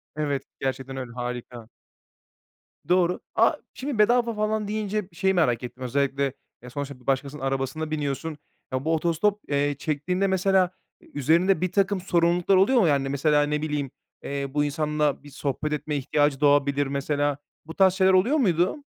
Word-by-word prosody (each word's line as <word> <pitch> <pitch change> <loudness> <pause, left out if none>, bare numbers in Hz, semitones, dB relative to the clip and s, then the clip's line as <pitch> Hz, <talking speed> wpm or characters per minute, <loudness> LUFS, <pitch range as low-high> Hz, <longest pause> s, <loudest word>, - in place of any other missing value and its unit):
Evet, 145 -3 -1 0.2
gerçekten 135 0 -3
öyle 130 -2 -6
harika. 120 -1 -6 1.2
Doğru. 180 0 +2 0.2
A! - - +4 0.2
şimdi 270 -2 -4
bedava 235 +2 +3
falan 215 0 -1
deyince 210 -1 -2
şeyi 190 +3 +1
merak 125 -11 +1
ettim, 125 +1 -7
özellikle, 135 +1 0 0.3
eee, 125 - -9
sonuçta 140 -1 -7
başkasının 140 +1 -1
arabasına 135 +3 -2
biniyorsun. 150 +1 -3 0.4
Ya 130 +2 -2
bu 160 - +2
otostop, 170 +6 +1
eee, 145 0 0
çektiğinde 175 +6 -1
mesela, 190 -1 +2 0.3
e, - - -20
üzerinde 165 +6 +2
birtakım 190 +1 +1
sorumluluklar 175 +1 +2
oluyor 205 +7 +4
mu? 180 - +4
Yani 140 -2 +1
mesela 145 +2 +2
ne 150 0 -1
bileyim, 150 -3 -2 0.3
eee, 140 0 -3
bu 145 0 +2
insanla 150 -1 0
bir 145 - -12
sohbet 145 +1 -3
etme 150 0 -3
ihtiyacı 145 0 +1
doğabilir 145 -1 +3
mesela. 145 +1 -1 0.3
Bu 160 - -8
tarz 190 -1 +5
şeyler 190 0 +3
oluyor 220 +12 +4
muydu? 190 - +1
150 Hz, 155 wpm, -25 LUFS, 140-185 Hz, 1.2 s, tarz